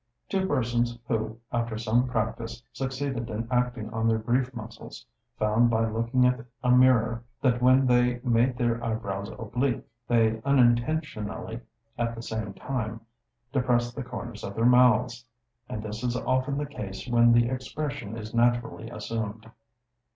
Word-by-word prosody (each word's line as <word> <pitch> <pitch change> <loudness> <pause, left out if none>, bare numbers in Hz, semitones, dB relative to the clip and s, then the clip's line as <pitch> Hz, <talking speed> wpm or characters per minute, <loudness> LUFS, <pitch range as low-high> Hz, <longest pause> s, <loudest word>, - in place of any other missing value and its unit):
Two 190 -1 0
persons 120 -4 0
who, 110 -1 -1
after 115 -2 -1
some 115 +3 +2
practice, 115 0 -3
succeeded 135 -2 -3
in 115 +1 -3
acting 125 -3 0
on 115 0 0
their 115 0 +3
grief 125 +4 0
muscles, 110 -1 -9 0.3
found 110 +3 +3
by 115 -1 +2
looking 115 +3 +1
at 125 -2 +2 0.2
a 125 - +3
mirror 120 -2 +4 0.2
that 125 -2 +2
when 130 +2 +5
they 125 0 +3
made 120 +1 +2
their 120 -1 0
eyebrows 100 -3 -3
oblique, 120 +2 -1 0.2
they 110 -2 +2
unintentionally 120 -3 +1 0.4
at 115 0 0
the 115 - -7
same 110 -3 -4
time 115 -4 -4 0.5
depressed 120 -3 +1
the 140 - -4
corners 120 -3 -7
of 100 - -5
their 115 - +1
mouths; 125 -1 +4 0.5
and 110 - -4
this 110 +2 -6
is 125 0 0
often 130 +2 0
the 145 - -1
case 105 -7 -7
when 120 -1 +5
the 120 0 +5
expression 130 -2 -4
is 110 0 -7
naturally 120 -1 +1
assumed. 110 -1 -5
120 Hz, 150 wpm, -27 LUFS, 110-125 Hz, 0.5 s, when